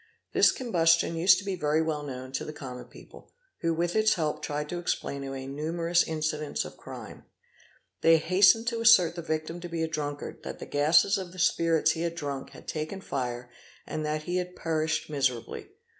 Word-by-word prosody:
This - - +6
combus 170 -10 +3
_ - - -6
tion 165 - -2
used 185 +3 +6
to 200 - -6
be 195 -1 -2
very 150 -2 +1
well 160 -2 -1
known 130 -2 -7
to 130 - -3
the - - -6
common 125 -4 -8
people, - - -15 0.3
who 165 - 0
with 170 +2 -1
its 220 0 +4
help 155 -3 -1
_ - - -21
tried 150 0 -3
to 175 - -3
explain 140 -5 -3
away 135 -1 -5
numerous 165 +5 0
incidents 155 -1 -2
of - - -9
crime: - - -10 0.8
they 165 0 +6
hastened 190 +7 +4
to 235 - -3
_ - - -3
assert 220 -8 +6
the 170 - -6
victim 160 +1 -3
to 175 0 -7
be 165 -1 -2
a - - 0
drunkard, 145 -2 -5
that - - -7
the - - -8
gases 160 +7 +3
of 180 -2 -7
the - - -12
spirits 165 -2 +3
he 160 - -4
had 170 0 -1
_ - - -15
drunk 140 -4 -5
had - - -14
taken 155 +5 -4
fire, 125 -7 -4 0.3
and 155 - -4
that 155 0 -2
he 175 +3 -2
had 180 0 -3
perished 160 -1 -1
miserably. 135 -6 -2
160 Hz, 215 wpm, -28 LUFS, 150-175 Hz, 0.8 s, This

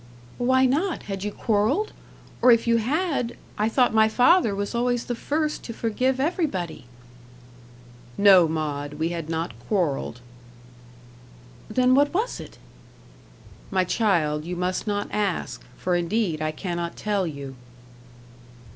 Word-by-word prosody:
"Why 260 +2 +3
not? 315 +8 0
Had 195 -1 -5
you 210 - -2
quarrelled? 220 - 0 0.5
or 250 - +7
if 230 -1 +4
you 230 0 +3
had, 275 +1 -1 0.2
I 215 +1 +1
thought 250 +1 +2
my 220 0 +5
father 250 - +4
was 200 +2 -3
always 245 0 0
the 245 - -2
first 300 +5 -2
to 230 - -6
forgive 255 +4 0
everybody." 270 - -2 1.3
"No, 190 -4 +7
Maud, 150 -2 -3
we 160 +2 -1
had 165 -2 -5
not 165 -2 -2 0.2
quarrelled." 145 - -1 1.5
"Then, 250 +3 +3
what 285 +4 +3
was 445 +6 -1
it?" - - -11 1.1
"My 190 -1 +2
child, 170 -7 +1
you 175 +2 -5
must 180 +3 -2
not 205 -1 -1
ask, 205 -4 -2 0.2
for 180 -1 0
indeed 175 -2 0
I 155 - 0
cannot 170 +1 -4
tell 205 -3 -1
you." 140 -3 -7
210 Hz, 135 wpm, -24 LUFS, 170-250 Hz, 1.5 s, or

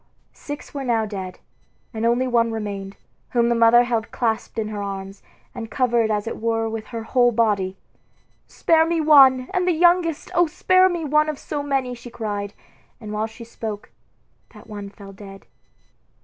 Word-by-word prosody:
Six 290 0 -9
were 280 -1 -4
now 230 -3 +1
dead, 190 -3 -6 0.6
and 225 +1 -1
only 240 +2 +2
one 235 -2 +2
remained, 200 -3 -5 0.4
whom 235 -1 +3
the - - +3
mother 230 +1 +5
held 230 -2 -2
clasped 225 -1 -2
in 215 -1 -2
her 210 -1 -5
arms, 195 0 -6 0.3
and 225 -1 -7
covered 240 -3 +1
as 210 -1 -1
it 225 - -6
were 225 0 0
with 220 -1 -5
her 230 -2 -6
whole 245 +1 +3
body. 205 -5 0 0.7
"Spare 325 -1 +3
me 335 0 0
one, 275 -4 +7
and 365 -1 0
that 360 - +3
the - - -4
youngest! 345 -2 +2
O 350 -1 +3
spare 370 +4 +3
me 345 -3 -3
one 300 +1 +2
of 305 - -4
so 290 +1 -4
many!" 270 -3 -1
she 240 0 -10
cried; 205 -3 -5 0.4
and 215 -3 -8
while 215 +1 -1
she 225 +1 -12
spoke, 220 -2 -7 0.6
that 210 - -14
one 205 -1 -8
fell 200 -1 -13
dead. 195 0 -12
230 Hz, 180 wpm, -22 LUFS, 210-270 Hz, 0.7 s, one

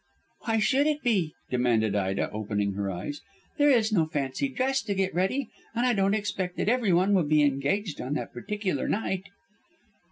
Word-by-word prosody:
"Why 225 -1 +1
should 270 +6 +3
it 300 -1 -1
be?" 190 -10 +1 0.2
demanded 115 -4 +2
Ida, 95 -1 -1
opening 105 -1 -2
her 100 0 -2
eyes. 95 +11 -5 0.4
"There 290 0 +5
is 230 -5 +3
no 165 -7 +2
fancy 145 - -2
dress 265 0 0
to 200 -3 -1
get 190 -1 0
ready, 195 +8 0 0.2
and 240 +2 +1
I 250 - +3
don't 195 -1 +2
expect 190 -4 -3
that - - -1
everyone 205 -5 +3
will 180 -6 +3
be 150 0 +4
engaged 145 +7 0
on 135 +4 -3
that - - -4
particular 185 - -2
night." 195 -3 -1
185 Hz, 180 wpm, -27 LUFS, 135-220 Hz, 0.4 s, There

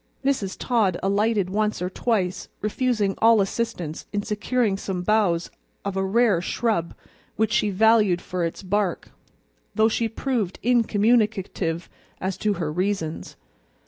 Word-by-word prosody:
Mrs. 215 -9 0
Todd 215 -8 +1
alighted 200 -1 +1
once 210 +1 0
or 180 - -1
twice, 190 -2 -1
refusing 215 -2 0
all 225 -1 +6
assistance 195 -6 -2
in 205 0 -1
securing 215 +1 0
some 190 -2 -4
boughs 185 -4 +1 0.3
of 200 -1 -2
a 190 - 0
rare 205 -2 +3
shrub 210 -4 -1 0.4
which 220 0 +1
she 210 -1 +2
valued 210 -2 +4
for 180 0 -3
its 165 +3 -3
bark, 195 -1 -1 0.6
though 220 0 +4
she 225 0 0
proved 225 -5 -2
incommunicative 210 -7 +1 0.3
as 190 0 -2
to 210 -1 +1
her 165 -6 -3
reasons. 180 -3 -2
205 Hz, 135 wpm, -24 LUFS, 185-225 Hz, 0.6 s, all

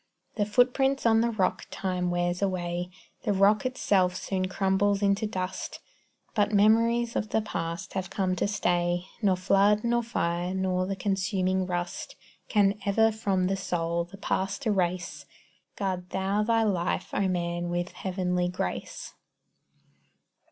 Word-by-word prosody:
The 205 -2 -1
footprints 260 +4 +2
on 225 -1 +5
the 235 - +2
rock 195 -5 -1
time 180 -2 -2
wears 175 +1 -1
away; 180 -2 -1 0.3
The 205 - 0
rock 205 +6 +4
itself 190 -8 +1
soon 185 0 -2
crumbles 195 +1 +1
into 200 +2 +2
dust; 185 -2 -4 0.5
But 210 -1 +2
memories 230 +3 +3
of 215 - -1
the - - +2
past 170 -1 -4
have 185 -1 -3
come 185 -2 0
to - - +1
stay, 175 -3 0 0.2
Nor 195 -3 +3
flood, 200 +3 +3
nor 240 0 +2
fire, 180 -5 -2
nor 185 -1 0
the 195 - -2
consuming 190 -1 0
rust, 175 -1 -4 0.3
Can 205 -1 +3
ever 225 +3 +3
from 200 -4 0
the 195 +1 +1
soul 170 -2 -1
the 175 +3 -12
past 195 +6 -2
erase. 175 -8 -1 0.5
Guard 185 -2 -3
thou 195 +2 0
thy 225 +1 +2
life, 185 -5 -1
O 200 - +1
man, 175 -1 -2
with 175 +1 -2
heavenly 180 -1 -1
grace. 135 - -4
190 Hz, 145 wpm, -28 LUFS, 180-210 Hz, 0.5 s, on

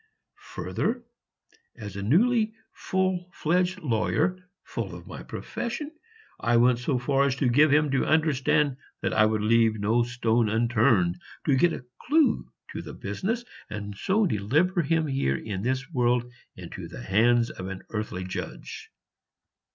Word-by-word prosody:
Further, 245 0 -2 0.7
as 105 -4 -8
a 100 - -4
newly 215 - +3 0.2
full 185 -1 -1
fledged 180 +3 0
lawyer, 125 - +1 0.3
full - - -5
of - - -11
my - - -8
profession, 290 +6 -5 0.5
I 120 0 +2
went 120 0 +4
so 130 +1 0
far 135 +3 +2
as 135 -1 +1
to 135 -1 +1
give 145 +6 +5
him 150 0 +3
to 135 - +1
understand 150 -3 +2 0.3
that - - 0
I 110 0 +5
would 110 -1 0
leave 110 0 +3
no 110 +4 +2
stone 120 -2 +1
unturned 110 -5 +2 0.2
to 140 - +3
get 170 +6 +4
a 125 - -7 0.2
clue 305 +1 +2 0.2
to - - -5
the - - -9
business, 230 +5 -3 0.2
and 105 -1 -6
so 200 - +1
deliver 155 - +1
him 160 +1 +1
here 135 - 0
in 100 -3 -5
this 130 +4 -1
world 125 -2 +1 0.2
into - - -8
the - - -9
hands 115 - +3
of 95 - -7
an 95 0 -7
earthly 105 -4 -3
judge. 90 - -7
125 Hz, 150 wpm, -26 LUFS, 110-165 Hz, 0.7 s, give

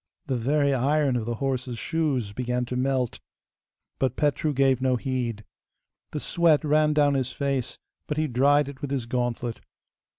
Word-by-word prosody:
The 135 - -1
very 140 +4 +2
iron 140 +1 +2
of 115 -2 -2
the 120 - -1
horse's 130 -1 -2
shoes 140 -9 -1
began 125 +1 -1
to 125 - -5
melt, 130 -1 0 0.8
but 130 -2 0
Petru 150 +1 +1
gave 135 -2 +2
no 130 -1 +2
heed. 120 -4 -2 0.7
The 150 - -4
sweat 165 -1 +2
ran 150 0 +3
down 145 -1 +3
his 130 -2 -1
face, 135 -3 -2 0.3
but 150 - -3
he 155 - +2
dried 145 +2 +3
it 140 -1 -9
with 145 - -3
his 135 -4 -2
gauntlet. 120 -1 -2
135 Hz, 165 wpm, -26 LUFS, 125-145 Hz, 0.8 s, ran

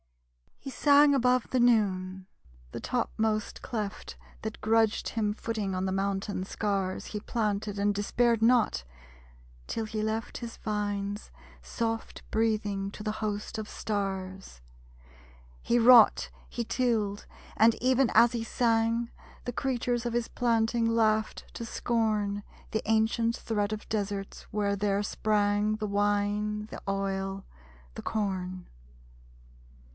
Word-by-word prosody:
He 275 - -8
sang 285 +1 +5
above 250 -2 +2
the 255 - +2
noon. 190 -6 +2 0.4
The - - -5
topmost 215 -1 -1
cleft 210 - -5 0.3
That - - -6
grudged 225 0 +2
him 210 -2 0
footing 210 -3 -3
on 185 +1 -1
the 190 - -1
mountain 195 0 -1
scars 195 -1 -2
He 210 - -4
planted 210 -2 -2
and 205 +1 +2
despaired 230 +3 +1
not; 230 - +3 0.8
till 225 - -2
he 215 0 -3
left 220 +1 -2
His 235 -1 -7
vines 205 - -3 0.3
soft 225 - -3
breathing 210 -3 0
to 210 - -9
the 215 0 -1
host 210 +1 -3
of 215 - -6
stars. 190 - -4 1.0
He 240 - +2
wrought, 240 -1 +7 0.2
he 235 - -3
tilled; 220 -4 0 0.3
and 225 +1 +5
even 255 0 +2
as 230 +2 +7
he 235 -2 -2
sang, 230 0 +1 0.4
The 245 - -3
creatures 245 -2 -1
of 235 - -3
his 240 -1 0
planting 230 -1 +1
laughed 220 -1 +1
to 230 - -5
scorn 215 -3 0 0.3
The 220 - 0
ancient 225 +1 +2
threat 210 -2 -1
of 215 0 -5
deserts 200 -2 -3
where 205 -1 0
there 200 0 0
sprang 210 0 +1
The 215 0 -3
wine, 205 +1 0
the - - -9
oil, 195 0 -2 0.5
the - - -6
corn! 185 -4 -3
215 Hz, 130 wpm, -29 LUFS, 200-230 Hz, 1.0 s, wrought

